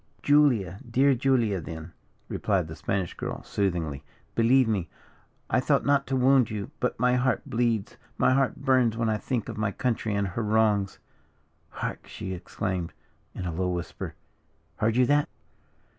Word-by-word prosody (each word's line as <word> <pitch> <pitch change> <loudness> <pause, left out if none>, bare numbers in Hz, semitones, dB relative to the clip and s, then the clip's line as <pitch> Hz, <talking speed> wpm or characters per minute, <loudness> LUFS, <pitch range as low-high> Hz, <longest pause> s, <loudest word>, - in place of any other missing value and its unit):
"Julia 125 - +3
dear 135 +4 +4
Julia, 120 -7 +1
then," 80 0 -8 0.4
replied 95 -6 0
the 80 - -7
Spanish 90 +3 -2
girl, - - -5
soothingly; 85 -8 -2 0.3
"believe 125 +2 +4
me, 100 -6 -1 0.6
I - - +2
thought - - +2
not 140 -1 +2
to 135 - 0
wound 130 -2 +4
you, 105 +4 -5
but 125 - -1
my 125 +1 +3
heart 125 -2 +1
bleeds, 115 -3 0 0.2
my - - +4
heart 135 -1 +2
burns 130 -5 +2
when 115 -1 +1
I 110 - +1
think 120 0 -2
of 115 -2 -6
my 110 -2 0
country 110 -1 -1
and 100 -1 0
her 105 +6 -3
wrongs. 105 -2 +2 0.7
Hark!" - - -5
she 95 - -6
exclaimed 90 -1 -3 0.4
in 90 - -4
a 85 - -3
low 90 +2 -1
whisper, 90 -1 -5 0.6
"heard 110 +1 +1
you 125 0 +5
that?" 145 +2 +2
110 Hz, 160 wpm, -27 LUFS, 95-125 Hz, 0.7 s, you